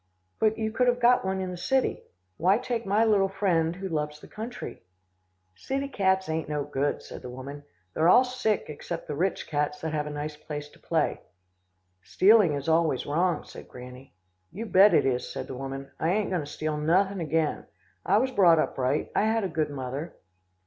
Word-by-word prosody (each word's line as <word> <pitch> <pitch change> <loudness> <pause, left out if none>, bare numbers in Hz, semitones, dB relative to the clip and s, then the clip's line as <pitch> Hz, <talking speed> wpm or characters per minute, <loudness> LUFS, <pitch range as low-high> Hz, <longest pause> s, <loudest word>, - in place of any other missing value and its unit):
"'But, 220 0 +2
you 220 -1 -2
could 250 +3 +1
have 245 0 +2
got 245 +1 +4
one 190 0 -1
in 185 -1 -3
the 180 - -6
city. 265 +8 0 0.4
Why 185 +5 +3
take 240 -3 -3
my 210 +3 +3
little 200 -3 +3
friend, 175 -4 +1
who 190 +1 -5
loves 150 -3 -3
the - - -13
country?' 225 +3 -7 0.7
"'City 270 - -3
cats 190 -5 +1
ain't 160 -1 -2
no 150 -1 -1
good,' 145 0 -2
said - - -9
the 125 - -8
woman. 135 +3 -8 0.3
'They're 160 +2 +3
all 245 - +7
sick, 250 -5 -1
except 165 +3 -6
the - - -3
rich 180 +5 -1
cats 150 -1 -1
that 160 -1 -3
have 150 -1 -1
a - - -4
nice 150 +1 -5
place 150 -1 -7
to - - -21
play.' - - -1 0.8
"'Stealing 190 - +4
is 140 +1 -5
always 160 -5 +2
wrong,' 170 +2 0
said - - -12
Granny. 125 +1 -12 0.4
"'You 220 +6 -6
bet 200 -1 +6
it - - +4
is,' 125 -2 -1
said - - -5
the - - -7
woman. 135 +1 -6
'I 160 - +1
ain't 205 +2 +1
goin' 180 -3 0
to 145 - -7
steal 155 0 -3
nothin' 185 +6 +2
again. 160 -1 -1 0.4
I - - +3
was 260 +4 +1
brought 180 -8 +5
up 155 - -1
right. 130 +3 0
I - - +3
had 225 0 +1
a - - 0
good 160 -3 -1
mother. 140 +3 -5
165 Hz, 205 wpm, -27 LUFS, 150-205 Hz, 0.8 s, all